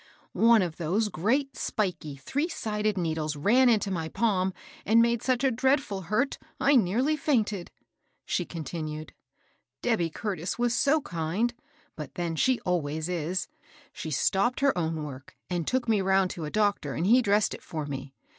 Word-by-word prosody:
^^ - - -25 0.3
One 230 -3 +5
of 170 -3 -4
those 190 +7 0
great 250 - 0
spikey, 180 -9 -2
three 270 - -2
sided 215 - -2
needles 160 -3 -1
ran 240 - +4
into 215 -3 +2
my 165 -3 -2
palm 190 -2 +1 0.3
and 225 +3 +4
made 235 -1 +3
such 255 -1 0
a 270 - +4
dreadM 255 - 0
hurt 230 - 0 0.2
I 285 +1 +4
nearly 245 +8 +3
fiunted," 220 - 0 0.6
she 180 - 0
continued. 155 -2 -6 0.7
Dehby 210 -9 +1
Curtis 185 -2 -3
was 240 0 +1
so 290 +5 +3
kind! 175 - -1 0.4
But 150 -4 -8
then, 170 -2 -2
she 255 - +2
always 160 -2 -1
is. 180 +1 -2 0.5
She 160 - -6
stopped 195 - +1
her 280 -1 +3
own 160 -3 -1
work 135 -3 -9
and 175 -2 -1
took 255 -1 0
me 215 -3 +3
round 190 -1 +2
to 165 - -5
a - - -4
doctor, 205 -8 0
and 165 - -1
he 240 +6 +6
dressed 210 -2 +2
it - - -8
for 155 -2 -5
me. 135 -1 -6
195 Hz, 170 wpm, -28 LUFS, 160-235 Hz, 0.7 s, he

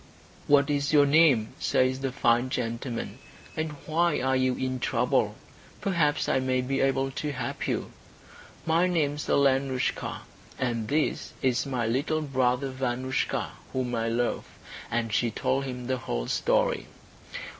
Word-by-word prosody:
"What 145 0 +4
is 145 0 0
your 145 -1 +7
name," 140 -7 +5
says 130 0 +2
the 135 -1 -2
fine 120 -2 +2
gentleman, 115 -1 -3 0.4
"and 155 -1 -2
why 170 +1 +2
are 130 +1 +1
you 130 -1 +2
in 130 0 -2
trouble? - - +1 0.4
Perhaps 165 -7 +1
I - - +2
may 130 0 +1
be 135 +2 -1
able 135 0 +1
to 150 +3 -3
help 125 -3 -4
you." - - -2 0.7
"My 165 +3 +3
name 160 -5 +1
is 150 - -6
Alenoushka, 135 -2 +1 0.4
and 120 -4 -1
this 150 +5 -1
is 130 +1 +1
my 125 -4 -1
little 140 +7 0
brother 130 -1 0
Vanoushka, 130 0 -1 0.2
whom 125 -2 -1
I 115 -1 0
love." 120 +1 -1 0.4
And 115 -1 -1
she 120 - +2
told 135 +4 -1
him 125 -2 -5
the 130 +1 0
whole - - -3
story. - - +1
130 Hz, 145 wpm, -27 LUFS, 125-145 Hz, 0.7 s, your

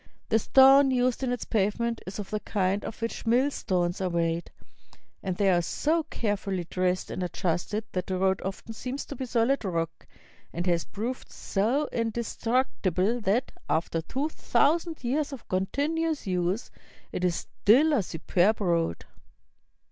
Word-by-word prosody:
The 225 - +4
stone 270 +3 +7
used 255 -1 +1
in 260 -2 0
its 245 - -3
pavement 225 +3 0
is 190 - -5
of 205 -2 -6
the 210 - 0
kind 195 -1 0
of - - -6
which 230 0 -4
millstones 210 -8 +1
are 185 - 0
made, 170 0 -1 0.7
and 185 -2 -3
they 195 -2 +4
are 175 -1 +3
so 310 - +1
carefully 195 -4 -2
dressed 180 +1 -1
and - - -4
adjusted 180 +4 -1
that 180 -1 -3
the 185 - -1
road 190 0 +2
often 195 +4 -5
seems 255 +5 -5
to 285 - -7
be 260 0 -4
solid 240 +3 +2
rock, 165 -4 -3 0.4
and 175 +1 -3
has 170 -2 +1
proved 235 +5 -5
so 240 +9 0
indestructible 230 -2 0
that, 220 +6 +1 0.2
after 165 +1 0
two 270 - -2
thousand 320 0 +1
years 285 +5 0
of 270 -4 -9
continuous 295 - -1
use, 180 +3 -1 0.4
it 180 - -3
is 180 -2 +2
still 280 - +3
a 265 - +3
su 175 -3 -6
perb 185 +6 +2
road. 170 - 0
210 Hz, 155 wpm, -27 LUFS, 185-255 Hz, 0.7 s, stone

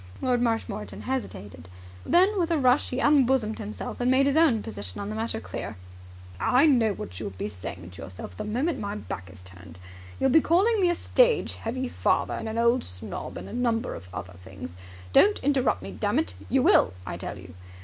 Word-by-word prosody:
Lord 250 -2 +1
Marshmoreton 225 -3 -2
hesitated. 100 - -5 0.4
Then 380 +3 +4
with 340 -2 +1
a 335 - +2
rush 255 0 +3
he 250 - -2
unbosomed 265 -6 +3
himself, 215 +3 -6
and 245 - +2
made 265 +1 +4
his 280 0 +2
own 305 -10 +4
position 100 -3 -7
on 200 - -4
the 215 - -4
matter 225 0 -2
clear. - - -6 0.6
"I 255 +4 +4
know 240 -8 +4
what 90 - -8
you'll - - -4
be 95 +1 -5
saying 90 -3 -8
to 90 - -11
yourself 90 -1 -9
the - - -5
moment 265 +8 -1
my 205 0 -4
back 95 - -6
is 95 -1 -14
turned. 90 -2 -13 0.4
You'll 265 - +3
be 320 - +6
calling 400 +8 +3
me 360 - +4
a 345 - +2
stage - - +3
heavy 255 +3 -4
father - - 0
and 220 - -4
an 220 - -4
old 235 +2 +3
snob 90 0 -6
and - - -7
a - - -9
number 235 -1 0
of 90 - -10
other 90 0 -7
things. 95 -2 -9 0.4
Don't 415 +1 +6
interrupt 260 - +1
me, 95 - -6
dammit! 90 0 0 0.2
You - - +3
will, 90 - +5
I - - -4
tell - - -6
you! - - -12
230 Hz, 200 wpm, -26 LUFS, -, 0.6 s, be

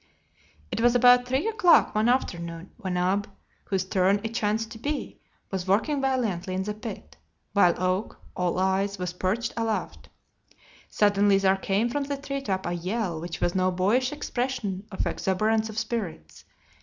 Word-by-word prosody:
It - - -2
was 240 +1 +4
about 245 0 +6
three 265 - 0
o'clock 430 -6 +4
one 215 +2 +2
afternoon 170 -8 -2
when 190 -6 -3
Ab, 195 +4 0 0.4
whose 190 -2 -1
turn 190 +1 +2
it 225 0 -4
chanced 220 0 -1
to 225 - -9
be, 290 +4 -4 0.3
was 190 -1 -3
working 250 +9 +2
valiantly 210 -9 -1
in 190 - -1
the 210 +2 -3
pit, 215 +1 -8 0.4
while 180 -4 +5
Oak, 185 +3 -1 0.2
all 180 -1 0
eyes, 190 +2 +1
was 180 -1 -3
perched 205 +6 -1
aloft. 210 - -3 0.8
Suddenly 205 -1 +3
there 195 0 +3
came 195 +3 0
from 280 +4 -2
the 280 0 -3
treetop 275 -9 -3
a 175 - -1
yell 180 -1 -2
which 170 0 -6
was 175 - +1
no 185 -1 +2
boyish 205 +8 +1
expression 240 -8 -3
of 190 - -2
exuberance 215 +3 0
of 220 - -8
spirits. 175 - -4
205 Hz, 160 wpm, -26 LUFS, 185-235 Hz, 0.8 s, about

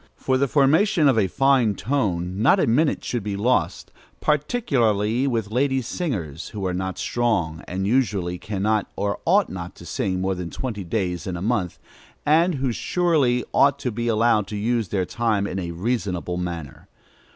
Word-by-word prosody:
For 130 - 0
the 140 +2 +2
formation 155 - +3
of 130 -5 +4
a 100 - +2
fine 130 -2 +2
tone, 95 -8 -1
not - - +5
a - - +3
minute 140 +7 +1
should 120 - -2
be 100 0 -3
lost, 120 +6 0 0.3
particularly 130 - +1
with 115 -5 -1
lady 135 +3 +1
singers, 100 - -4
who 100 -3 -5
are 90 - -1
not 95 +1 -3
strong, 100 -10 -1
and 95 +2 -3
usually 100 -7 0
cannot 105 +1 -1
or 100 0 -2
ought 195 +2 +3
not 90 0 -7
to 85 - -13
sing 95 +2 -2
more 95 +1 0
than 90 -2 -5
twenty 110 -4 -4
days 90 -2 -2
in 90 -2 -3
a - - -6
month, 105 -6 -1 0.5
and 165 +3 +3
who 130 -2 -1
surely 140 -4 +1
ought 140 0 +4
to 125 -3 -3
be 120 +2 -3
allowed 110 -2 +2
to 105 - -5
use 115 0 0
their 95 0 -1
time 110 -1 0
in 95 -1 -3
a 85 -2 -4
reasonable 90 -2 -2
manner. 85 -5 -6
110 Hz, 175 wpm, -23 LUFS, 95-130 Hz, 0.5 s, not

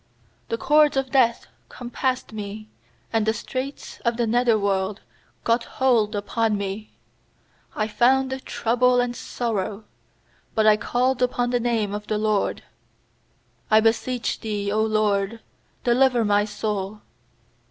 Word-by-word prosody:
3The 230 - -1
cords 295 +3 +4
of 270 -1 -1
death 240 -4 +3 0.2
compassed 255 0 -3
me, 215 0 -6 0.5
And 225 -1 +2
the 220 - +2
straits 260 +5 -6
of 235 -1 -1
the 240 - +1
nether 235 0 +3
worlc 195 -1 0 0.5
got 235 +1 +1
hold 230 -5 +3
upon 215 +1 0
me; 200 +2 -5 0.8
I 215 - 0
found 265 +3 +2
trouble 245 +1 +2
and 245 0 0
sorrow. 215 -4 -3 0.7
4But 220 - +4
I 215 -1 +7
called 250 +4 0
upon 245 -1 +1
the 245 - +2
name 225 -4 0
of 210 0 -5
th* 215 - -1
LORD: 215 -1 0 1.1
'I 215 - +6
beseech 230 +2 0
Thee, 210 -2 -3
0 210 +2 0
LORD, 215 0 0 0.5
delivei 245 -1 +3
my 205 0 +3
soul. 210 -1 -4
225 Hz, 130 wpm, -24 LUFS, 210-245 Hz, 1.1 s, I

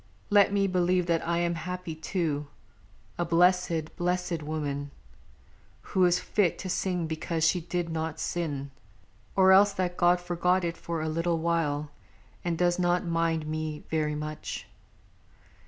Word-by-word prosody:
Let 205 -1 +6
me 200 -1 +2
believe 180 -1 +2
that 170 -1 +1
I 170 0 +1
am 170 0 +1
happy, 180 +1 -5
too. 155 -2 -2 0.7
A - - +2
blessèd 170 -1 +2
blessèd 180 -1 -1
woman, 145 -2 -3 1.0
who 185 -1 +5
is 175 0 +4
fit 190 -3 +1
To 185 - -6
sing 180 -2 -1
because 160 +1 -2
she 180 +1 +2
did 175 0 -3
not 160 0 -3
sin; 145 -5 -3 0.6
or 190 -1 +6
else 200 +1 +6
That 180 -2 -2
God 175 0 +4
forgot 180 +1 +1
it 170 -1 -1
for 165 -2 -4
a - - -2
little 165 +2 0
while 155 -3 0 0.5
And 170 -2 -1
does 175 +1 +2
not 175 0 +2
mind 165 -2 0
me 155 0 -4
very 155 -1 0
much. 150 0 -5
170 Hz, 150 wpm, -28 LUFS, 160-180 Hz, 1.0 s, Let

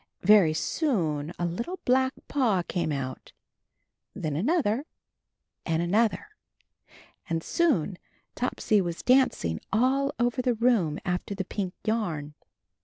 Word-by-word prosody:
Very 190 -5 +6
soon 165 - -1
a 175 - -1
little 235 - -3
black 260 +1 +3
paw 225 -10 +1
came 170 -3 -2
out, 130 -3 -5 0.8
then 155 -2 -3
another, 265 - +1 0.8
and 165 -1 0
an 175 +2 -2
other, 225 - +2 1.0
and 165 0 -1
soon 205 - +1 0.3
Topsy 220 -4 +1
was 170 -2 -4
dancing 250 - +2
all 265 +5 +2
over 240 +2 +1
the 250 -2 +1
room 220 -10 +2
after 180 +2 -2
the 190 -1 -3
pink 190 -2 -4
yarn. 170 -10 -2
205 Hz, 120 wpm, -27 LUFS, 165-250 Hz, 1.0 s, Very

